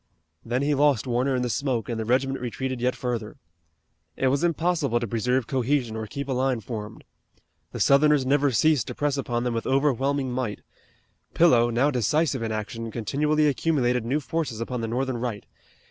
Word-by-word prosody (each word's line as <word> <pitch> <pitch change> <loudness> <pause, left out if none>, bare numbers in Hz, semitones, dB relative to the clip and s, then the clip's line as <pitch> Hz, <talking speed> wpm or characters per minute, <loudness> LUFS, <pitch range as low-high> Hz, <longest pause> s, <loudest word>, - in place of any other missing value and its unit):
Then 125 +4 -1
he 145 +1 +2
lost 145 -4 +3
Warner 130 +2 0
in 125 - 0
the - - 0
smoke 120 -1 -1
and 115 -2 -3
the 110 - -2
regiment 135 +3 +1
retreated 125 +1 -4
yet 125 +1 +1
further. 120 -4 -4 0.8
It 130 - +2
was 140 +4 0
impossible 165 -7 +1
to 120 - -3
preserve 120 +3 0
cohesion 130 -2 0
or 110 -1 -4
keep 140 +6 -5
a - - -3
line 130 -1 +1
formed. 110 -2 -7 0.7
The 120 - -6
Southerners 140 +3 +4
never 145 +1 +3
ceased 135 0 +2
to - - -6
press 145 -1 0
upon 120 -3 -2
them 125 -1 -1
with 115 - -3
overwhelming 135 -1 +1
weight. 115 -6 -3 0.7
Pillow, 120 -9 +5
now 125 +5 +2
decisive 130 +2 +1
in 115 -1 -2
action, 110 +2 -4
continually 150 +7 0
accumulated 125 -3 +1
new 130 +6 0
forces 140 -4 -3
upon 120 +1 -3
the 115 - -2
Northern 130 +2 -1
right. 115 -3 -4
125 Hz, 180 wpm, -25 LUFS, 115-140 Hz, 0.8 s, Pillow